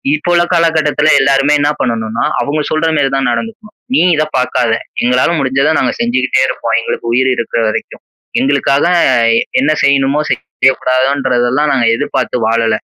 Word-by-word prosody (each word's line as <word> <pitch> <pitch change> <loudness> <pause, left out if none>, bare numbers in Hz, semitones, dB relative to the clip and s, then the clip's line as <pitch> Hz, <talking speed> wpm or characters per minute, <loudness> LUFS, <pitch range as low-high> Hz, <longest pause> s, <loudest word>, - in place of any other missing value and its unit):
இப்போ 155 +3 -5
உள்ள 175 0 +3
காலக்கட்டத்தில 160 -3 +1
எல்லாருமே 135 +2 +2
என்ன 145 0 +1
பண்ணனுன்னா, 115 -1 -2 0.2
அவுங்க 150 +2 -2
சொல்றமாரி 155 -3 0
தான் 135 -2 0
நடந்துக்கணும். 215 - -6 0.2
நீ - - +3
இத 155 - +1
பார்க்காத, 125 -2 0 0.3
எங்களால 125 +3 +2
முடிஞ்சத 135 +3 +1
நாங்க 125 - 0
செஞ்சுகிட்டே 125 +2 0
இருப்போம். 115 -3 -2
எங்களுக்கு 115 - -5
உயிர் 130 +2 +2
இருக்கிற 115 -1 -2
வரைக்கும். - - -6 0.4
எங்களுக்காக 140 +1 +1 0.7
என்ன 145 +3 +1
செய்யணுமோ 140 +1 +2
செய்யக்கூடாதோன்றதெல்லாம் 130 +1 0
நாங்க 125 -3 +1
எதிர்பார்த்து 125 - -2
வாழல. 115 -1 +1
135 Hz, 135 wpm, -13 LUFS, 125-150 Hz, 0.7 s, உள்ள